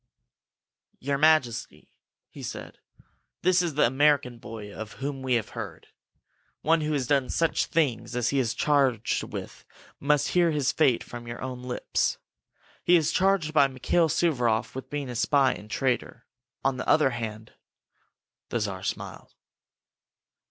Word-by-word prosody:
"Your 140 +1 -2
Majesty," 155 -7 +2 0.4
he - - -12
said, - - -7 0.6
"this 185 0 +4
is 170 -5 -2
the 150 - +4
American 130 -1 +2
boy 105 -2 -8
of 110 0 -7
whom 135 0 -5
we 130 -1 +1
have 115 -3 -1
heard. - - -8 0.7
One 160 +1 +3
who 155 0 -1
has 140 -3 0
done 135 -1 +1
such 165 -1 +1
things 120 -7 0
as 120 -1 +1
he 140 - +1
is 120 -3 0
charged 135 -6 +2
with - - -7 0.4
must 145 0 +2
hear 175 -1 +3
his 145 -6 +1
fate 130 -7 +2
from 120 -1 -9
your 120 0 -6
own 130 -1 -5
lips. 125 -1 -1 0.7
He 175 - +5
is 160 -3 +3
charged 185 -5 +2
by 145 -3 +5
Mikail 135 +6 +1
Suvaroff 120 -9 +1
with 130 - -7
being 145 -2 -3
a 125 - -5
spy 135 +2 +3
and - - -10
a - - -18
traitor. 125 0 -2 0.4
On 135 -1 +2
the 125 - -4
other 150 -4 +4
hand 110 -2 -6 0.5
" - - -49
The 120 - -1
Czar 100 -3 -3
smiled. 95 - -6
130 Hz, 160 wpm, -27 LUFS, 120-150 Hz, 0.7 s, He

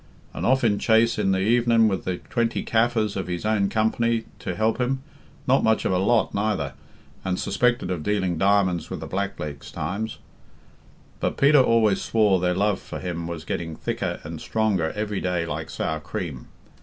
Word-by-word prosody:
And - - -2
off 130 0 +3
in 105 -3 +2
chase 115 +1 +3
in 95 - +2
the 95 0 +1 0.2
everin' 115 -2 +4
with 95 -4 -2
the 90 -1 -1
twenty 115 -1 -1
Kaffirs 115 -2 +1
of 95 -2 -3
his 90 +2 -4
own 105 -2 +2
company 115 +1 +1 0.2
to - - -4
help 110 +3 +1
him 130 +2 -1 0.4
not 135 0 +3
much 110 0 +2
of - - +2
a 90 - +2
lot 110 +4 +2
neither, 100 -10 -1 0.5
and 90 -1 -1
suspected 120 -6 +1
of 90 -4 -2
dealing 95 -2 0
diamonds 95 -3 +2
with - - -5
the - - -6
blacklegs 90 -8 -4
times; 110 +4 -3 1.0
but - - -1
Peter 140 0 +6
always 115 -5 +3
swore 105 -4 +3
their 90 0 +1
love 100 +1 +1
for - - -8
him 85 -2 -4
was 85 -1 -6
getting 85 -3 -3
thicker - - -3
and 80 0 -7
stronger 105 -7 0
every 105 -1 -2
day 90 -2 -1
like - - -4
sour 80 0 -2
cream. 80 - -6
100 Hz, 180 wpm, -24 LUFS, 90-115 Hz, 1.0 s, Peter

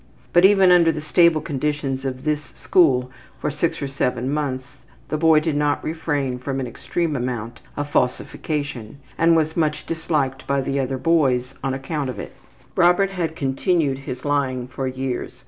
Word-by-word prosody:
But 175 +1 +6
even 195 -2 +6
under 170 -2 +6
the 155 - -4
stable 160 +1 +3
conditions 140 -2 -2
of 130 -1 -4
this 150 -1 0
school 130 -5 +2 0.3
for 150 - -2
six 150 +1 -1
or - - -1
seven 130 -1 -1
months 135 -3 -3 0.3
the - - -1
boy 160 -1 +5
did 155 -2 -1
not 145 0 +1
refrain 145 -5 -2
from 135 +1 -3
an 130 - -2
extreme 160 +6 -2
amount 120 -2 -4 0.2
of 145 0 -3
falsification 140 -1 -2 0.2
and 165 0 +4
was 160 0 +1
much 155 -3 0
disliked 150 -5 -2
by 140 0 +1
the 135 +1 -1
other 135 0 -1
boys 135 -5 +2
on 135 -1 -1
account 135 +1 -3
of 125 - -5
it. - - -8 0.4
Robert 185 +2 +4
had 170 -4 -2
continued 140 -1 0
his 130 -1 -7
lying 135 -4 0
for 130 +1 -4
years. 130 0 -3
145 Hz, 170 wpm, -22 LUFS, 130-160 Hz, 0.4 s, But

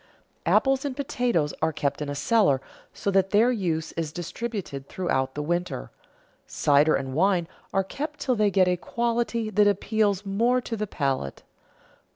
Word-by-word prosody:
Apples 270 0 +3
and 280 -3 -3
potatoes 245 - 0
are 160 0 +2
kept 145 -1 -2
in 145 - -3
a 145 - -3
cellar 190 - +3 0.3
so 200 - -2
that 195 -1 +3
their 220 +5 +4
use 165 -8 -1
is 165 -2 -3
distributed 175 - -5
throughout 130 -8 -1
the 150 - -2
winter; 175 - -2 0.6
cider 145 +2 +3
and 135 -1 -3
wine 175 +2 +2 0.2
are 195 -1 +2
kept 295 +9 -5
till 265 -2 +1
they 210 -3 +3
get 190 -2 +3
a 180 0 +2
quality 235 +1 -1
that 210 +1 +4
appeals 205 0 +1
more 230 +6 +2
to 240 -2 -4
the 215 -1 -3
palate. 135 - -2
195 Hz, 165 wpm, -26 LUFS, 155-230 Hz, 0.6 s, their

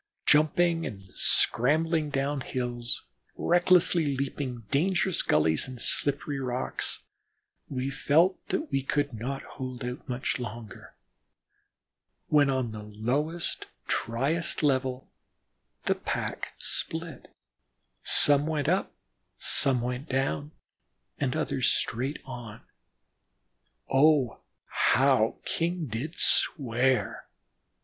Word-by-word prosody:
Jumping 165 +3 +3
and 95 - -8
scrambling 155 +4 +2
down 140 0 -1
hills, 120 -1 -3 0.3
recklessly 175 -4 +3
leaping 130 -2 -3
dangerous 185 +5 +2
gullies 80 - +3
and 130 -2 -9
slippery 145 +2 +1
rocks, 125 -1 -3 0.7
we 135 0 -3
felt 165 +7 +2
that 310 - -2
we 135 - +1
could 145 0 -1
not 130 +5 -4
hold 130 -2 -7
out 125 +1 -6
much 125 +1 -2
longer; 115 -3 -8 1.3
when 145 -2 +4
on 130 -4 -1
the 110 -1 -7
lowest, 125 +11 -2 0.2
dryest 140 +10 -1
level 130 -2 0 0.8
the - - +2
pack - - -4
split, 165 0 -4 0.7
some 145 +1 +5
went 155 -3 -1
up, - - 0 0.4
some 130 -3 +5
went 125 +5 -4
down, 135 +2 -1 0.7
and 135 -2 -1
others 140 -5 0
straight 130 +6 -1
on. 120 -4 -8 1.3
Oh, 135 -4 +3 0.3
how 130 -5 +2
King 170 0 -1
did 135 +8 -5
swear! 130 -2 +1
135 Hz, 100 wpm, -28 LUFS, 125-150 Hz, 1.3 s, some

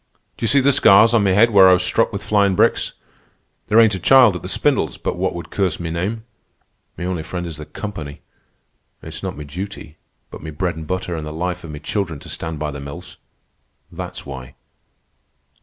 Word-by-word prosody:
D'ye 115 - -2
see 140 +4 +4
the 140 +2 +4
scars 115 -3 +6
on 115 - +4
me 100 -2 +2
head 115 +3 +5
where 95 -3 +7
I - - +7
was 90 0 +2
struck - - +1
with - - -5
flying 100 -2 +2
bricks? - - +2 0.7
There 110 - +4
ain't 110 -2 +5
a 95 - -3
child 120 0 +6
at 90 - -5
the - - -7
spindles - - +1
but - - -3
what 95 0 -2
would 85 - -8
curse 95 -5 -1
me 85 -1 -4
name. 100 +7 -3 0.7
Me 90 - -4
only 90 -3 -2
friend 90 +2 -5
is 80 -3 -7
the 75 - -9
company. 80 -9 -7 0.8
It's - - -8
not - - -5
me 75 - -7
duty, 85 0 -8 0.3
but - - -9
me 80 - -7
bread 85 +3 -2
an' 80 -1 -7
butter 90 +1 -3
an' 80 - -5
the 75 - -6
life 90 +3 -3
of 80 - -9
me 75 - -7
children 85 0 -3
to - - -11
stand 80 -1 -5
by 75 0 -3
the 70 - -7
mills. 70 +6 -9 0.7
That's - - -7
why." 65 -2 -9
90 Hz, 210 wpm, -20 LUFS, 80-100 Hz, 0.8 s, where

